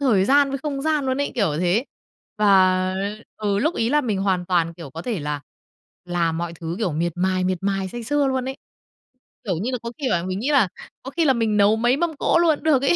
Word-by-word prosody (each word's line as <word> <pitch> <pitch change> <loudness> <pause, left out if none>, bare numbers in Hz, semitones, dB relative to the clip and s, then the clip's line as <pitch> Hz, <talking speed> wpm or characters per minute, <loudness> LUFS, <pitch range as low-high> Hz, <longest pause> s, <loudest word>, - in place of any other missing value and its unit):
thời 220 -9 +3
gian 280 +3 +4
với 275 - -3
không 275 -1 -4
gian 305 -3 +1
luôn 260 +2 0
ấy, 285 - -1
kiểu 200 -10 +1
thế. 185 +8 +2 0.5
Và, 185 -2 +4 0.4
ừ, 205 -2 0
lúc 310 +10 +1
ấy 230 +2 0
là 295 - +4
mình 220 -8 -1
hoàn 190 -2 0
toàn, 170 -3 +1
kiểu, 160 -5 -10
có 165 +3 -7
thể 220 -7 -3
là 145 -1 -3 0.6
làm 170 -2 -1
mọi 170 0 -3
thứ, 165 0 -5
kiểu, 190 -8 -1
miệt 170 +2 -1
mài, 185 0 +1
miệt 185 -1 0
mài 195 -1 -1
say 240 +5 -7
sưa 285 +4 +1
luôn 260 0 -1
ấy, 265 - -5 0.9
kiểu 190 -5 -1
như 250 - -1
là, 250 - -1
có 235 +1 -5
khi 275 - -1
là 170 -6 +1
mình 185 0 -3
nghĩ 270 - -1
là 255 -10 +4 0.3
có 270 - -7
khi 330 +2 0
là 270 - +5
mình 225 -3 0
nấu 205 +2 +4
mấy 240 +3 +2
mâm 330 -1 -1
cỗ - - +3
luôn 335 -2 +4
cũng - - -17
được 285 -4 +3
ấy. 280 - +3
215 Hz, 250 wpm, -22 LUFS, 185-270 Hz, 0.9 s, là